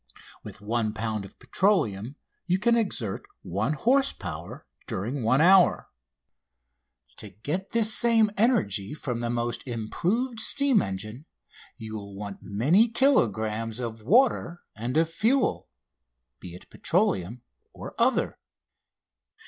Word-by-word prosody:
With - - -11
one 110 0 -1
pound 110 -2 -3
of - - -15
petroleum 125 - 0 0.3
you 180 +1 +2
can 235 +4 +2
exert 130 - -2 0.2
one 100 - -1
horse 265 - +2
power 85 -3 -8 0.2
during 120 +9 -3
one 130 +5 +2
hour. 185 +1 +4 1.3
To 105 - -9
get 150 - -5
this 220 -1 +4
same 225 -3 +4
energy 110 - 0
from 125 -6 -4
the 120 0 -3
most 120 +1 -3
improved 180 - -2
steam 275 -1 +4
engine 105 - -6 0.5
you 110 -1 -8
will 100 -2 -8
want 100 0 -7
many 150 - +2
kilogrammes 115 - +1
of 115 -2 -5
water 200 - +2
and 120 +6 -3
of 165 0 +3
fuel, 225 +11 0 0.7
be 90 -1 -10
it 90 - -14
petroleum 100 +7 -1 0.3
or - - -9
other. - - +1
120 Hz, 125 wpm, -26 LUFS, -, 1.3 s, hour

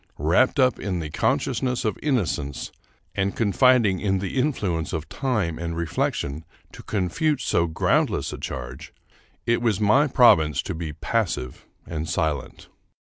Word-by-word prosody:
Wrapped 85 - +2
up 130 -2 +3
in 95 -2 -2
the 75 -2 -5
conscious - - 0
ness 125 -3 -1
of 110 - 0
innocence, 90 - -1 0.4
and 100 0 -1
confiding 115 -2 +3
in 95 -2 0
the 95 +4 -4
influence 100 - -1
of 80 -1 -3
time 105 - -1
and 85 -1 -4
reflection 80 -2 -2 0.3
to - - -11
confute 140 - 0
so 85 0 +1
groundless 80 - 0
a - - -7
charge, 65 +4 -7 0.5
it 115 0 +1
was 115 -5 +1
my 120 +8 +4
province 80 - +4
to - - -4
be 80 -1 -5
passive 80 - -2 0.2
and 80 -1 -4
silent. 75 0 -2
95 Hz, 145 wpm, -24 LUFS, 80-120 Hz, 0.5 s, my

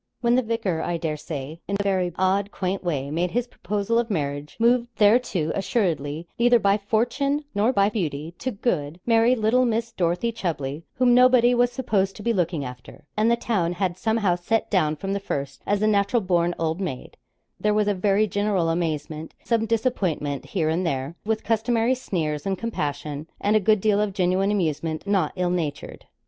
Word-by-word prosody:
When 235 -1 +3
the 255 - +4
vicar, 225 -8 -1
I 175 - -1
dare 160 -2 -2
say, 150 +1 -6
in 200 - -1
a - - 0
very 185 -3 +1
odd, 190 +2 +1
quaint 190 -1 -3
way, 145 -5 -2
made 170 +3 0
his 240 +5 -1
proposal 210 0 -1
of 235 0 -1
marriage, 145 -5 -3
moved 240 +1 +3
thereto 205 -7 +3
assuredly, 165 - -1
neither 240 0 +5
by 200 -2 +3
fortune, 270 +8 0
nor 210 +4 +2
by 200 -5 +3
beauty, 165 -6 -3
to 260 - -2
good, 180 - -2
merry, 230 +1 +4
little 230 +2 +2
Miss 230 -1 0
Dorothy 180 +6 0
Chubley, 155 -9 -3
whom 250 -1 +4
nobody 250 -1 +6
was 245 0 +3
supposed 195 -7 0
to 205 - -9
be 235 - +1
looking 170 -6 -1
after, 125 +3 -10
and 215 +2 +2
the 235 - +4
town 195 -8 -1
had, 180 0 -1
somehow, 220 -1 +1
set 190 +6 -1
down 155 -6 +2
from 195 +5 -4
the 200 - -1
first 140 -7 -4
as 205 +1 +1
a - - +4
natural 205 +2 +2
born 175 -1 +1
old 165 +3 -1
maid 150 -10 -5 0.4
there 210 - +1
was 210 -1 +2
a 205 - +3
very 200 +2 +2
general 200 -4 0
amazement; 160 -2 -3
some 225 -1 +1
disappointment 190 - -1
here 170 -6 -1
and 165 +4 0
there, 140 -1 -2
with 220 0 -1
customary 230 +2 +1
sneers 165 - -3
and 190 -1 0
compassion, 150 -8 -4
and 205 +1 +1
a - - +6
good 215 +1 +3
deal 210 0 +2
of 210 -2 -1
genuine 185 +1 +1
amusement 160 -5 -1
not 195 -6 +1
ill 180 -1 0
natured. 160 -5 -4
195 Hz, 190 wpm, -24 LUFS, 165-225 Hz, 0.4 s, nobody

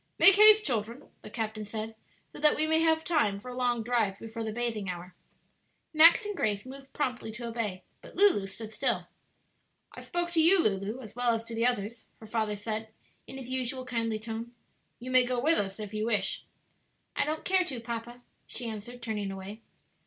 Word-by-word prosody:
"Make 390 - +9
haste, 425 +1 +8
children," 235 +2 -3
the - - -10
captain 220 -1 -4
said, 220 +1 -5 0.4
"so - - -9
that 300 0 +5
we 310 - +1
may 320 +1 +3
have 320 -1 +3
time 250 -14 +1
for 250 - -10
a - - -6
long 245 -2 0
drive 220 -5 +1
before 225 +2 -6
the 220 - -3
bathing 225 -4 -2
hour." 180 0 -7 0.8
Max 330 +6 +7
and 415 -1 -4
Grace 210 - -1
moved 270 +1 -11
promptly 250 -6 -3
to 235 +2 -7
obey, 225 -5 -3 0.2
but - - -14
Lulu 365 - +4
stood 215 +3 -9
still. 245 +2 -1 0.9
"I - - -9
spoke 345 0 -2
to 330 -2 +3
you, 345 +5 +8
Lulu, 210 - 0
as 220 -3 -11
well 245 -1 +2
as 225 0 -5
to 230 - -8
the 230 +1 +2
others," 230 -1 -3
her 220 - -11
father 215 -1 -1
said, 220 +1 -5 0.4
in 270 - -9
his 255 -1 -7
usual 255 0 -3
kindly 230 -3 -1
tone; 225 +2 -6 0.5
"you 255 +1 -7
may 255 0 +6
go 250 0 -1
with 315 +6 +3
us, 195 0 -3
if 210 -1 -7
you 215 +1 -2
wish." 200 -4 0 0.7
"I - - +2
don't 310 +1 -3
care 375 0 +3
to, 265 -8 -4
papa," 235 +1 -6 0.2
she 240 - -3
answered, 230 +3 -7
turning 210 -3 -3
away. 195 +3 -8
235 Hz, 200 wpm, -29 LUFS, 215-260 Hz, 0.9 s, Make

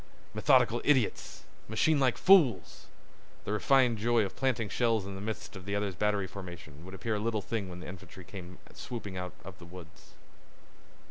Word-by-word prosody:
Methodical 120 +2 +3
idiots! 130 -7 +1 0.2
Machine 140 +8 +2
like 130 -3 +2
fools! 135 - +4 0.6
The - - -3
refined 120 +1 +3
joy 115 0 +2
of 95 - -7
planting 125 -5 0
shells 115 -1 +1
in 100 - -6
the 95 - -7
midst 110 0 -5
of 95 -1 -9
the 100 0 -2
other 100 -1 -1
battery's 100 0 -1
formation 85 -6 -9
would 95 +1 -9
appear 110 +4 -3
a 105 - -1
little 110 -1 -1
thing 105 -3 -3
when 90 0 -8
the - - -8
infantry 95 0 -10
came 90 -1 -10 0.2
swooping 105 -6 -7
out 90 -1 -5
of 95 -1 -10
the 85 - -11
woods. 85 -2 -13
105 Hz, 180 wpm, -30 LUFS, 95-115 Hz, 0.6 s, fools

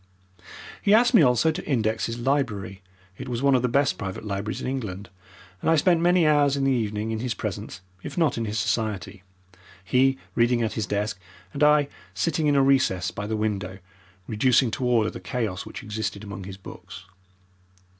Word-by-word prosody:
He 205 +1 +5
asked 240 +3 +4
me 225 - +7
also 125 +3 +4
to 155 - -6
index 110 -5 0
his 115 0 -4
library 115 -7 -1 0.4
(it - - -6
was 120 +1 -3
one 140 -1 +4
of 130 - +3
the 125 - +1
best 140 +3 +1
private 95 +1 -5
libraries 100 +1 -3
in - - -5
England), 100 -8 -5 0.5
and - - 0
I 165 - +5
spent 165 +2 +3
many 175 0 +4
hours 145 -2 +3
in 135 - -1
the 135 - +3
evening 110 -3 -1
in 110 - -2
his 120 0 -2
presence, - - -5 0.2
if - - -8
not 165 -3 +2
in 115 - -2
his 105 +1 -3
society, 105 -2 -2 0.6
he 130 +7 +2 0.2
reading 120 0 +2
at 110 - -1
his 110 -3 -3
desk 105 0 -2 0.3
and 140 - -5
I 150 -1 +5 0.3
sitting 160 -2 0
in 145 - +3
a 135 - +5
recess 130 -9 +2
by 105 0 -5
the 110 0 -2
window 100 -3 -2 0.5
reducing 120 +2 +3
to 125 - -3
order 115 -3 +2
the - - -8
chaos 110 -7 -3
which - - -8
existed 105 -1 -4
among 100 -2 -7
his 95 0 -8
books. 95 - -11
115 Hz, 195 wpm, -25 LUFS, 105-140 Hz, 0.6 s, me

